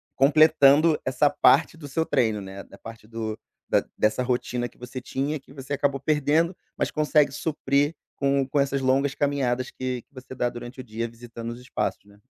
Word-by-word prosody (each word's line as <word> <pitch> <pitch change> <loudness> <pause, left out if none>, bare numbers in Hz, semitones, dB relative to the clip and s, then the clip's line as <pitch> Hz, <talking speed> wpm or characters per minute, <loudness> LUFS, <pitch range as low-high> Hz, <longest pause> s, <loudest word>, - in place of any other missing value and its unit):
completando 155 +1 +5
essa 130 +3 +3
parte 160 +3 +4
do 145 -3 -9
seu 160 +4 -1
treino, 115 -7 +1
né. 95 0 -8
Da - - -16
parte 115 -1 -11
do 110 -1 -4 0.3
da - - +2
dessa 110 +4 +2
rotina 125 -1 -1
que - - -27
você 125 +1 -7
tinha, 145 +4 -2
que 135 - -20
você 140 0 -6
acabou 140 -1 0
perdendo, 155 +4 +1 0.2
mas - - -1
consegue 150 -2 +3
suprir 145 0 0 0.2
com 140 -1 +1
com 145 +1 0
essas 140 0 +1
longas 135 +1 +1
caminhadas 130 -3 0
que 130 -1 -4
que - - -42
você 130 -1 -10
dá 125 -1 0
durante 120 +2 -9
o - - -5
dia, 115 0 -4
visitando 115 0 -8
os 120 +1 -7
espaços, 125 - -3
né. 100 0 -19
135 Hz, 190 wpm, -25 LUFS, 120-145 Hz, 0.3 s, completando